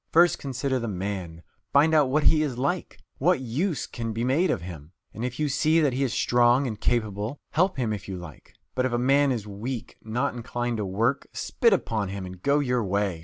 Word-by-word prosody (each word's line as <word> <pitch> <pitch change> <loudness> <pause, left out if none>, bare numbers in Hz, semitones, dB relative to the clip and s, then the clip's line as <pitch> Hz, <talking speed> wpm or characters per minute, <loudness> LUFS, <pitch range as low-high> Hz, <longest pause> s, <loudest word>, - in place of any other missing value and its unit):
First 170 +1 +5
consider 135 -1 -2
the 120 - -3
man, 90 -4 -4 0.3
find 150 +3 +5
out 150 -4 +4
what 150 +3 +2
he 155 -1 +5
is 140 -6 -2
like, 140 +7 -2 0.2
what 175 +2 +3
use 140 - -1
can 115 -2 -5
be 115 +2 -2
made 145 +9 +2
of 85 - -1
him; 85 -2 -9 0.2
and 110 - -6
if 125 +2 -4
you 150 - +1
see 155 +3 +3
that 145 -5 +2
he 130 - -1
is 135 -3 +1
a - - -3
strong 120 +2 +3
and 110 -4 -4
capable 105 -4 0
man, 145 - -9
help 185 +1 +2
him 115 -4 0
if 100 -2 -6
you 95 -2 -4
like. 80 -5 -12 0.2
But 130 0 +1
if 125 - -5
a - - +2
man 135 +3 +3
is 115 -5 -2
weak, 110 +4 -6
not 120 +6 -1
inclined 120 0 -3
to 105 - -2
work 115 +8 0
spit 230 - +1
upon 115 - 0
him 100 -1 -5
and 90 -1 -9
go 140 +6 +3
your 125 -4 +1
way. 100 -3 -1
120 Hz, 230 wpm, -26 LUFS, 105-140 Hz, 0.3 s, First